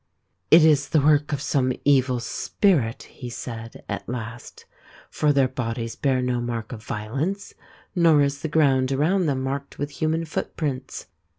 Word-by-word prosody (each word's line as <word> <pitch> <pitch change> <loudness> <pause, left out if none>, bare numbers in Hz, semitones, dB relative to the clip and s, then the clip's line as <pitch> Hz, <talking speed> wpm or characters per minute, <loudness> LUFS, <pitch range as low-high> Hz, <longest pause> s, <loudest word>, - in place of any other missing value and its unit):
" 90 - -49
It 160 0 +8
is 145 -3 +3
the 155 - +3
work 145 +1 +3
of 145 -1 -2
some 130 -3 +1
evil 130 -3 +3
spirit," 120 - 0
he 125 -3 -9
said 115 -1 -8
at 100 +1 -5
last, 120 -1 -7 0.2
" - - -23
for 150 - +2
their 140 -2 +3
bodies 115 -2 -4
bear 130 -3 +1
no 125 -1 0
mark 115 -2 -4
of 115 -3 -7
violence, 135 - -3 0.4
nor 165 -4 +5
is 140 0 -1
the - - -2
ground 135 -4 +2
around 165 +6 +2
them 135 -2 -1
marked 140 +1 -4
with 145 +1 -3
human 160 +3 -1
footprints. 140 -4 -4
135 Hz, 170 wpm, -24 LUFS, 120-150 Hz, 0.4 s, It